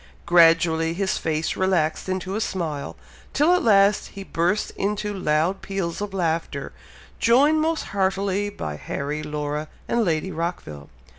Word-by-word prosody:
Gradually 165 Hz, -1 st, +4 dB
his 190 Hz, +1 st, -1 dB
face 160 Hz, 0 st, -1 dB
relaxed 185 Hz, -3 st, 0 dB
into 185 Hz, 0 st, -3 dB
a 220 Hz, -, -1 dB
smile, 160 Hz, -9 st, -3 dB, 0.4 s
till 310 Hz, +5 st, +4 dB
at 360 Hz, -, +3 dB
last 200 Hz, -2 st, +4 dB
he 195 Hz, -, -9 dB
burst 180 Hz, +3 st, 0 dB
into 210 Hz, +1 st, -2 dB
loud 175 Hz, +1 st, 0 dB
peals 195 Hz, -2 st, -3 dB
of 205 Hz, -1 st, -3 dB
laughter, 170 Hz, -4 st, -2 dB, 0.5 s
joined 285 Hz, +7 st, +4 dB
most 320 Hz, +1 st, 0 dB
heartily 195 Hz, +1 st, 0 dB
by 75 Hz, -, -6 dB
Harry, 145 Hz, -, -4 dB
Laura, 150 Hz, 0 st, -3 dB, 0.2 s
and 235 Hz, -1 st, +1 dB
Lady 170 Hz, 0 st, -1 dB
Rockville. 155 Hz, -, -5 dB
185 Hz, 140 wpm, -23 LUFS, 160-200 Hz, 0.5 s, Gradually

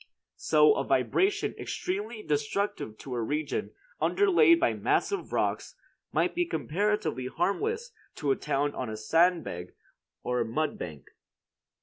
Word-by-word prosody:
So 440 Hz, -1 st, +5 dB
a -, -, -1 dB
vibration 400 Hz, +2 st, +1 dB
extremely 210 Hz, +4 st, -4 dB
destructive 145 Hz, -, -2 dB
to 135 Hz, -, -7 dB
a 120 Hz, -, -1 dB
region 150 Hz, +6 st, -2 dB, 0.3 s
underlaid 360 Hz, -4 st, +5 dB
by 335 Hz, -, +2 dB
massive 400 Hz, -1 st, 0 dB
rocks -, -, -1 dB, 0.4 s
might -, -, +1 dB
be 350 Hz, -, +1 dB
comparatively 160 Hz, -, -1 dB
harmless 440 Hz, -, -1 dB, 0.2 s
to 145 Hz, -5 st, 0 dB
a -, -, +3 dB
town 145 Hz, +1 st, -1 dB
on 130 Hz, -3 st, -4 dB
a 110 Hz, -, -5 dB
sand 165 Hz, +10 st, +3 dB
bed 90 Hz, +1 st, -7 dB, 0.5 s
or 125 Hz, -1 st, 0 dB
mud 145 Hz, +7 st, -2 dB
bank. 75 Hz, -6 st, -7 dB
160 Hz, 130 wpm, -28 LUFS, -, 0.5 s, So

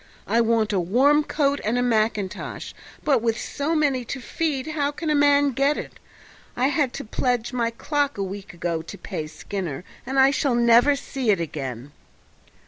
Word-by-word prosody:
I 230 Hz, -, +2 dB
want 225 Hz, -2 st, +2 dB
a 195 Hz, -, +2 dB
warm 265 Hz, -, +3 dB
coat 285 Hz, -2 st, 0 dB
and 225 Hz, +3 st, 0 dB
a 245 Hz, -, +2 dB
mackintosh, 215 Hz, -4 st, -1 dB, 0.3 s
but 275 Hz, -6 st, +3 dB
with 230 Hz, 0 st, 0 dB
so 300 Hz, +4 st, -2 dB
many 280 Hz, -5 st, +1 dB
to 265 Hz, -, -5 dB
feed 280 Hz, +1 st, -2 dB
how 295 Hz, -2 st, 0 dB
can 305 Hz, +2 st, -3 dB
a -, -, +3 dB
man 285 Hz, -1 st, +4 dB
get 275 Hz, +4 st, +1 dB
it? -, -, -7 dB, 0.6 s
I 255 Hz, +2 st, +3 dB
had 280 Hz, -2 st, +1 dB
to -, -, -6 dB
pledge 245 Hz, +1 st, -1 dB
my 235 Hz, -2 st, +1 dB
clock 285 Hz, +3 st, -1 dB
a 200 Hz, -, -1 dB
week 195 Hz, +1 st, -7 dB
ago 170 Hz, -1 st, -2 dB
to 160 Hz, -, -9 dB
pay 155 Hz, -, -5 dB
Skinner, 175 Hz, -2 st, -5 dB, 0.2 s
and 265 Hz, +2 st, -1 dB
I 265 Hz, +1 st, +6 dB
shall 275 Hz, -2 st, +1 dB
never 235 Hz, +4 st, +5 dB
see 270 Hz, -3 st, -3 dB
it 200 Hz, -4 st, +4 dB
again." 140 Hz, -5 st, -5 dB
245 Hz, 185 wpm, -24 LUFS, 205-285 Hz, 0.6 s, I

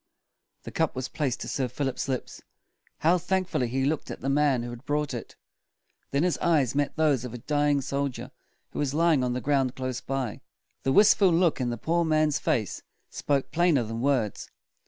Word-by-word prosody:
The -, -, -8 dB
cup -, -, 0 dB
was 130 Hz, 0 st, -3 dB
placed 140 Hz, -5 st, -2 dB
to -, -, -5 dB
Sir 130 Hz, -2 st, -1 dB
Philip's 135 Hz, 0 st, -3 dB
lips. 130 Hz, -2 st, -4 dB, 0.6 s
How 175 Hz, +3 st, +4 dB
thank 190 Hz, +1 st, 0 dB
ful 185 Hz, -, -1 dB
ly 125 Hz, -, +1 dB
he 130 Hz, +3 st, -1 dB
looked 150 Hz, +1 st, -1 dB
at -, -, -6 dB
the 135 Hz, -, -2 dB
man 140 Hz, -3 st, +2 dB
who 120 Hz, -, -5 dB
had 120 Hz, +1 st, -9 dB
brought 150 Hz, 0 st, -1 dB
it! -, -, -7 dB, 0.7 s
Then 140 Hz, +3 st, +1 dB
his 180 Hz, -1 st, +1 dB
eyes 150 Hz, -8 st, +2 dB
met 145 Hz, 0 st, 0 dB
those 150 Hz, -6 st, +2 dB
of 125 Hz, -1 st, -6 dB
a -, -, -4 dB
dying 145 Hz, +2 st, +1 dB
soldier 135 Hz, -2 st, -3 dB, 0.4 s
who -, -, -6 dB
was 145 Hz, -1 st, -1 dB
lying 160 Hz, -4 st, +3 dB
on 125 Hz, -1 st, 0 dB
the 125 Hz, -, -3 dB
ground 135 Hz, -2 st, +1 dB
close 130 Hz, -1 st, -3 dB
by. 130 Hz, -5 st, -3 dB, 0.4 s
The 135 Hz, -, 0 dB
wist 205 Hz, +8 st, +6 dB
ful 195 Hz, -3 st, +6 dB
look 170 Hz, -4 st, +2 dB
in 125 Hz, -, 0 dB
the 120 Hz, -, -3 dB
poor 170 Hz, +8 st, +1 dB
man's 155 Hz, -2 st, +2 dB
face 125 Hz, -, -1 dB, 0.3 s
spoke 140 Hz, -2 st, -1 dB
plainer 170 Hz, -7 st, +3 dB
than 115 Hz, +1 st, -5 dB
words. 130 Hz, -6 st, 0 dB
140 Hz, 205 wpm, -27 LUFS, 125-155 Hz, 0.7 s, wist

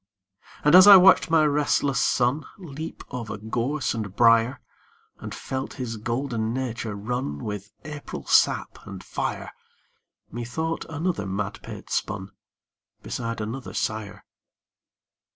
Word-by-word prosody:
And 150 Hz, -, +4 dB
as 185 Hz, +2 st, +10 dB
I 200 Hz, -, +12 dB
watched 185 Hz, -1 st, +6 dB
my 160 Hz, -1 st, +4 dB
restless 145 Hz, -3 st, +1 dB
son 125 Hz, +5 st, +1 dB
Leap 160 Hz, -4 st, -8 dB
over 115 Hz, -4 st, -5 dB
gorse 120 Hz, +7 st, -2 dB
and 105 Hz, -4 st, -5 dB
briar, 115 Hz, +1 st, +4 dB, 0.6 s
And -, -, -7 dB
felt 130 Hz, 0 st, -5 dB
his 120 Hz, -4 st, -5 dB
golden 115 Hz, 0 st, -2 dB
nature 120 Hz, -4 st, -3 dB
run 105 Hz, -, -3 dB
With 105 Hz, -1 st, -5 dB
April 150 Hz, -1 st, -7 dB
sap -, -, +2 dB
and -, -, -8 dB
fire, -, -, -4 dB, 0.8 s
Methought 140 Hz, +8 st, -3 dB
another 160 Hz, -, -2 dB
madpate 100 Hz, +1 st, -5 dB
spun 100 Hz, -2 st, -2 dB, 0.7 s
Beside 115 Hz, -2 st, -4 dB
another 120 Hz, +5 st, -6 dB
sire. 110 Hz, -2 st, -3 dB
120 Hz, 115 wpm, -25 LUFS, 110-145 Hz, 0.8 s, I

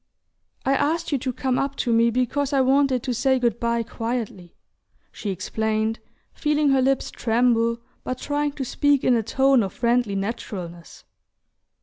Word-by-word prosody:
"I 270 Hz, -, +3 dB
asked 315 Hz, +5 st, 0 dB
you 280 Hz, -, +1 dB
to 255 Hz, +1 st, -2 dB
come 255 Hz, 0 st, -1 dB
up 275 Hz, 0 st, -2 dB
to 240 Hz, -4 st, 0 dB
me 230 Hz, +1 st, +4 dB
because 255 Hz, +4 st, -1 dB
I 270 Hz, -, +4 dB
wanted 265 Hz, -1 st, +2 dB
to 255 Hz, -, -1 dB
say 265 Hz, +2 st, +2 dB
good 235 Hz, -2 st, 0 dB
bye 235 Hz, 0 st, 0 dB
quietly," 225 Hz, -7 st, -5 dB, 0.6 s
she 210 Hz, -, -6 dB
explained, 220 Hz, +3 st, -1 dB, 0.3 s
feeling 300 Hz, -1 st, +1 dB
her 270 Hz, -1 st, +3 dB
lips 270 Hz, 0 st, +1 dB
tremble, 235 Hz, 0 st, +1 dB, 0.3 s
but 255 Hz, -, -3 dB
trying 290 Hz, +1 st, -2 dB
to 275 Hz, -2 st, -4 dB
speak 285 Hz, +2 st, +2 dB
in 250 Hz, -, +4 dB
a 230 Hz, -, +2 dB
tone 265 Hz, +3 st, +3 dB
of 195 Hz, -2 st, -3 dB
friendly 235 Hz, -2 st, +1 dB
naturalness. 195 Hz, -5 st, -6 dB
245 Hz, 160 wpm, -23 LUFS, 225-270 Hz, 0.6 s, me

